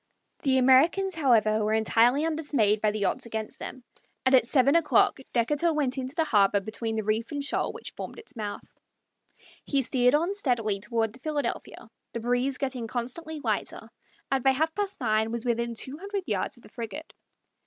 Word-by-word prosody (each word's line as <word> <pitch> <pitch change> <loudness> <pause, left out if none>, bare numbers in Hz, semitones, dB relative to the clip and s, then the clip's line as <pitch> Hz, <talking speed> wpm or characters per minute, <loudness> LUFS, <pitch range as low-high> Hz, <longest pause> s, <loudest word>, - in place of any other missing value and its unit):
The 265 -2 +2
Americans, 300 +10 +4
however, 225 -8 +3
were 215 +1 +1
entirely 235 +6 +3
undismayed 285 -10 +1
by 215 - +3
the 210 -1 -1
odds 245 +6 -1
against 220 -1 -5
them, 255 - -8 0.4
and 260 - +3
at 250 -3 +5
seven 275 +2 +3
o'clock 330 -4 +3
Decatur 295 +8 +1
went 270 -4 0
into 260 +2 -5
the 325 - +2
harbor 205 -8 +3
between 220 +2 -4
the 220 - -1
reef 215 +4 -1
and 285 -1 -3
shoal 280 - -1
which - - -7
formed - - -8
its 450 - -10
mouth. 210 -3 -5 1.0
He 275 -2 0
steered 250 +1 +3
on 340 +6 +1
steadily 235 - 0
toward 225 0 -1
the 255 - -15
Philadelphia, 295 +1 -4 0.3
the 235 - -3
breeze 245 +3 0
getting 260 -4 -3
constantly 290 +7 -4
lighter, - - -3 0.4
and 270 -2 +1
by 270 - +5
half 315 +4 0
past 405 0 -2
nine 220 -1 +1
was 235 +1 -4
within 235 -1 -1
two 265 +6 -4
hundred 400 +1 -4
yards 210 - -2
of 240 - -20
the - - -15
frigate. 235 +8 -7
255 Hz, 185 wpm, -27 LUFS, 225-295 Hz, 1.0 s, at